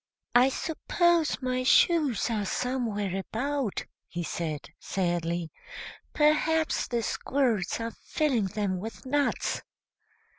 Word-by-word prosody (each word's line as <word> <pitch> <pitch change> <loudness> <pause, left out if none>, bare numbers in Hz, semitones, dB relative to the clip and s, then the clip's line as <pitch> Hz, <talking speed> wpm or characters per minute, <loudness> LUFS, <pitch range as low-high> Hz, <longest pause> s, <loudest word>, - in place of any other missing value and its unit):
] - - -56
"I 250 +2 +7
suppose 330 +1 +1
my 255 0 0
shoes 270 - +4
are 215 -2 0
somewhere 220 -7 -1
about," 250 +4 -2 0.2
he 175 0 -4
said, 155 -3 -4
sadly. 170 -3 -1 0.6
"Perhaps 310 +1 +2
the 235 -2 -1
squirrels 235 -7 0
are 230 0 -3
filling 260 -4 0
them 190 -1 -2
with 225 +7 -7
nuts." 285 +2 0
240 Hz, 110 wpm, -28 LUFS, 195-285 Hz, 0.6 s, I